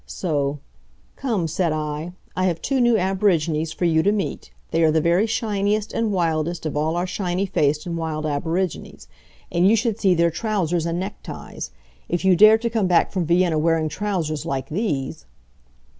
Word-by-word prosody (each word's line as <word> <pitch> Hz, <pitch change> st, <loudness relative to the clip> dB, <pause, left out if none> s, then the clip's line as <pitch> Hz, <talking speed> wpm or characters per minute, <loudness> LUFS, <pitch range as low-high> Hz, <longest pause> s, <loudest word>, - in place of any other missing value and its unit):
So, 145 Hz, -5 st, -1 dB, 0.6 s
"Come," 220 Hz, -11 st, -1 dB
said 170 Hz, +1 st, 0 dB
I. 155 Hz, +2 st, -3 dB, 0.2 s
"I 185 Hz, -, +1 dB
have 170 Hz, -3 st, 0 dB
two 270 Hz, -2 st, 0 dB
new 240 Hz, -2 st, +4 dB
aborigines 175 Hz, -5 st, +1 dB
for 175 Hz, -, -2 dB
you 160 Hz, -2 st, +3 dB
to 200 Hz, -, +3 dB
meet. 195 Hz, -9 st, -3 dB, 0.2 s
They 165 Hz, -, +1 dB
are 160 Hz, -, +5 dB
the 160 Hz, +1 st, +3 dB
very 170 Hz, +7 st, +2 dB
shiniest 210 Hz, -1 st, -1 dB
and 225 Hz, -2 st, 0 dB
wildest 165 Hz, -2 st, -1 dB
of 155 Hz, -, -3 dB
all 155 Hz, +2 st, 0 dB
our 175 Hz, +1 st, 0 dB
shiny 180 Hz, 0 st, -2 dB
faced 150 Hz, -5 st, 0 dB
and 170 Hz, -1 st, -3 dB
wild 160 Hz, -2 st, -3 dB
aborigines. 165 Hz, +4 st, -3 dB, 0.4 s
And 175 Hz, +2 st, +3 dB
you 225 Hz, -, +5 dB
should 225 Hz, -1 st, -1 dB
see 190 Hz, -3 st, +3 dB
their 170 Hz, 0 st, +3 dB
trousers 175 Hz, -3 st, -1 dB
and 170 Hz, +1 st, -2 dB
neckties! 195 Hz, +3 st, -7 dB, 0.4 s
If 175 Hz, +2 st, -1 dB
you 190 Hz, -1 st, +6 dB
dare 215 Hz, +4 st, +7 dB
to 235 Hz, +1 st, -2 dB
come 220 Hz, -4 st, +1 dB
back 175 Hz, -2 st, +3 dB
from 180 Hz, -5 st, -1 dB
Vienna 170 Hz, -2 st, +3 dB
wearing 160 Hz, 0 st, +1 dB
trousers 170 Hz, -6 st, -2 dB
like 135 Hz, -1 st, -3 dB
these! 155 Hz, -, -3 dB
175 Hz, 180 wpm, -22 LUFS, 155-200 Hz, 0.6 s, dare